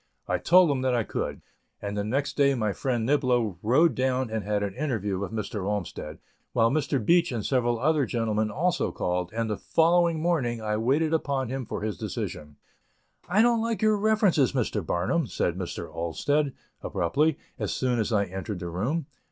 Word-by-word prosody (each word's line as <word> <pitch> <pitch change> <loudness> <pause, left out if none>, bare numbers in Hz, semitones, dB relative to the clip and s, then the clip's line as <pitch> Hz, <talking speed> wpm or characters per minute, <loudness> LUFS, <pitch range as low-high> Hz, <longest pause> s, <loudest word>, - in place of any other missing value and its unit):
I - - 0
told 180 -2 +5
him 135 -2 -1
that 130 -1 +1
I 120 - +1
could, - - -4 0.4
and 100 0 -4
the 100 - -1
next 140 +6 -1
day 140 -1 +3
my 110 -4 0
friend 120 -2 -1
Niblo 125 - +1
rode 150 +10 +4
down 130 -2 0
and 110 -2 -2
had 105 +1 0
an 100 -2 -3
interview 110 -9 -2
with 100 - -4
Mr. 105 -2 -4
Olmsted, 95 -6 -4 0.4
while 115 -2 +3
Mr. 140 -1 0
Beach 170 +2 +4
and 115 -4 -3
several 120 -3 +1
other 145 +1 +2
gentlemen 110 -2 0
also 175 - 0
called, 90 0 -2
and 115 0 -2
the 105 -2 -2
following 170 0 +3
morning 150 -9 0
I 105 -1 -1
waited 145 +8 +1
upon 140 -5 0
him 130 -2 -4
for - - -4
his 105 -3 -3
decision. 75 -1 -5 0.7
"I 205 +5 +4
don't 235 -1 +3
like 230 -1 -1
your 215 0 +4
references, 205 - +3
Mr. 115 -6 -1
Barnum," 90 - 0
said 85 - -1
Mr. 90 -2 -5
Olmsted, 140 - 0 0.3
abruptly, 145 - +1 0.2
as - - -2
soon 125 -2 0
as 110 - -1
I 105 -2 +3
entered 95 +1 -5
the 90 -1 -5
room. 125 - -1
125 Hz, 185 wpm, -27 LUFS, 105-150 Hz, 0.7 s, told